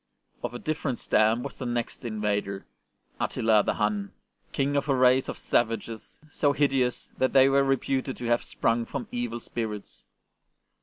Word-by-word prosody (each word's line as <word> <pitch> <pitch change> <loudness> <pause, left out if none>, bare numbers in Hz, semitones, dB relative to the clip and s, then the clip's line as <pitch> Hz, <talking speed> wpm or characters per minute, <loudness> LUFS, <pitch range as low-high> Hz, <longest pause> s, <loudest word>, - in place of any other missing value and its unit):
Of 120 - -4
a - - -2
different 150 -3 -2
stamp 110 +3 +2
was 140 - -7
the 130 - -4
next 120 +1 -3
invader, 105 -3 -2 0.5
Attila 110 -2 +3
the - - -1
Hun, 105 -1 -1 0.4
King 140 +1 0
of 140 +1 0
a 135 - +4
race 130 0 +4
of - - -4
savages 115 -1 -1
so 145 -1 +2
hideous 135 -3 +1
that 130 - +2
they 135 -1 +7
were 140 0 +4
reputed 135 0 0
to 120 - -6
have 120 0 +2
sprung 115 +1 0
from 140 -3 -5
evil 120 -1 -3
spirits. 110 -3 -6
120 Hz, 160 wpm, -27 LUFS, 110-135 Hz, 0.5 s, they